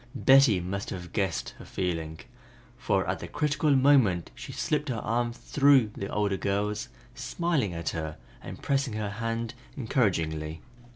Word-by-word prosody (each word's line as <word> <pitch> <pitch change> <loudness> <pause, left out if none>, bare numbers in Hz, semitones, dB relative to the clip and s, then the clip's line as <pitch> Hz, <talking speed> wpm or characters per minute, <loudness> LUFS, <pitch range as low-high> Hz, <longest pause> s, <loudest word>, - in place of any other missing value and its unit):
Betty 135 -6 +6
must 95 +3 -4
have 90 -2 -7
guessed 95 -6 -1
her - - -10
feeling, 80 -3 -3 0.6
for - - 0
at - - -1
the - - -6
critical 150 0 0
moment 130 - +4
she - - -9
slipped 150 -1 -1
her 125 - -1
arm 120 +2 -1
through 130 0 +3
the 100 - -5
older 100 -1 0
girl's, 105 +2 -1 0.2
smiling 145 - -1
at 85 0 -2
her 80 -1 -4 0.2
and - - -8
pressing 135 -3 0
her 105 -1 -3
hand 115 +2 -3 0.2
encouragingly. 80 - -1
105 Hz, 150 wpm, -28 LUFS, 90-135 Hz, 0.6 s, Betty